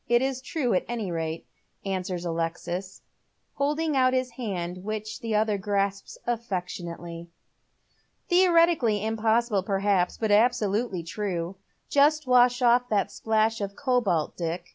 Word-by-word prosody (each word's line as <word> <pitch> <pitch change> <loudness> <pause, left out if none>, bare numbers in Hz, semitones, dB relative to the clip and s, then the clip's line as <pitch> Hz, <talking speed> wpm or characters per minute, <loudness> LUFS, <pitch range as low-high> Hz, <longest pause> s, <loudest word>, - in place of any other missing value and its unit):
It's 260 +2 +2
true, 260 -3 -1
at 180 - +2
any 225 -6 -3
rate," 165 -1 -3 0.4
answers 185 -2 -3
Alexis, 170 +3 -4 0.5
holding 300 +2 0
out 255 -1 +4
his 255 -1 0
hand, 185 -7 -4
which 215 +1 -4
the 225 -2 -2
other 210 -1 +1
grasps 200 0 -2
affectionately. 175 -7 -4 1.0
"Theoretically 335 - +4
impossible, 225 -1 +1
perhaps, 195 -2 +1
but 220 -2 -1
absolutely 210 -3 +2
true. 180 0 -3 0.3
Just 300 +2 +3
wash 250 0 +4
off 245 +1 +4
that 200 -1 +1
splash 220 0 0
of 200 0 -4
cobalt, 240 - 0
Dick. 170 0 -3
215 Hz, 120 wpm, -26 LUFS, 185-245 Hz, 1.0 s, out